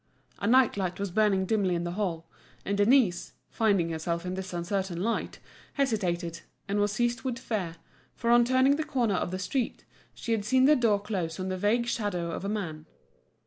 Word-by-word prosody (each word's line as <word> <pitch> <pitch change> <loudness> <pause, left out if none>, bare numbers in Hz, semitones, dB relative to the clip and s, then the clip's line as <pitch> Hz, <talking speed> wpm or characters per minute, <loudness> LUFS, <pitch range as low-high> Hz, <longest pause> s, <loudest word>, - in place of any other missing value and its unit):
A - - -1
night 255 -2 +4
light 185 -2 -2
was 200 -2 -3
burning 200 -1 +2
dimly 195 -3 +1
in 170 - -2
the 175 - -3
hall, 175 -4 -3 0.4
and 200 - 0
Denise, 205 -4 +3 0.2
finding 200 -7 +2
herself 170 +2 -3
in 180 - -3
this 190 0 -5
uncertain 180 0 -2
light, 225 +5 -2 0.4
hesitated, 180 - -1 0.3
and 200 +1 0
was 205 0 +2
seized 240 +2 0
with 255 -3 -3
fear, 200 -10 -3 0.4
for 235 -1 0
on 240 0 +7
turning 260 +3 +3
the 315 - -1
corner 250 -8 0
of 180 - -1
the 185 - -3
street, 225 +7 -2 0.3
she 230 - -5
had 220 -3 +1
seen 260 +4 +3
the 300 +2 +6
door 225 -6 +2
close 190 -5 -3
on 185 0 -3
the 185 - -1
vague 215 +5 +2
shadow 200 -8 -2
of 165 - -5
a 200 - -2
man. 165 -7 -4
200 Hz, 195 wpm, -28 LUFS, 180-235 Hz, 0.4 s, on